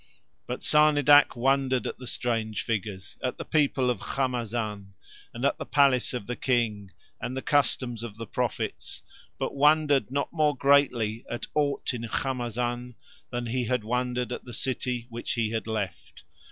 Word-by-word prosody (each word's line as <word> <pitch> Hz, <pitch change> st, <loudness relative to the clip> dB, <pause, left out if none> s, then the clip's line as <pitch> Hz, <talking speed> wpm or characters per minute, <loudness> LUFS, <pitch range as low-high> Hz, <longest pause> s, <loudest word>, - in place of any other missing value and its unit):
But -, -, -4 dB
Sarnidac 145 Hz, -1 st, +6 dB
wondered 130 Hz, +1 st, +2 dB
at -, -, -4 dB
the 125 Hz, -, -8 dB
strange 115 Hz, -4 st, -1 dB
figures, 105 Hz, -4 st, -4 dB
at 125 Hz, -, -1 dB
the -, -, -6 dB
people 140 Hz, -4 st, +2 dB
of 120 Hz, -, -3 dB
Khamazan, 115 Hz, -6 st, -2 dB, 0.4 s
and 120 Hz, +3 st, -3 dB
at 140 Hz, -, +1 dB
the -, -, -4 dB
palace 135 Hz, -3 st, +3 dB
of 120 Hz, -, -4 dB
the 125 Hz, -, -3 dB
King 115 Hz, -7 st, 0 dB, 0.3 s
and 130 Hz, -, -3 dB
the -, -, -2 dB
customs 130 Hz, -5 st, +1 dB
of 115 Hz, -3 st, -7 dB
the 115 Hz, -, -5 dB
prophets, -, -, -3 dB, 0.3 s
but -, -, -2 dB
wondered 145 Hz, -4 st, +4 dB
not 140 Hz, +2 st, -2 dB
more 150 Hz, -3 st, +2 dB
greatly 125 Hz, -6 st, +3 dB
at 120 Hz, -, -4 dB
aught 145 Hz, -2 st, 0 dB
in 120 Hz, -, -4 dB
Khamazan 120 Hz, 0 st, -2 dB, 0.3 s
than 120 Hz, -1 st, -3 dB
he 125 Hz, +1 st, -1 dB
had 125 Hz, -1 st, 0 dB
wondered 125 Hz, +2 st, -1 dB
at -, -, -4 dB
the 120 Hz, -, -10 dB
city 125 Hz, 0 st, -2 dB
which 120 Hz, +1 st, -3 dB
he 115 Hz, -3 st, 0 dB
had 115 Hz, 0 st, -2 dB
left. 100 Hz, -6 st, -4 dB
125 Hz, 165 wpm, -27 LUFS, 115-135 Hz, 0.4 s, Sarnidac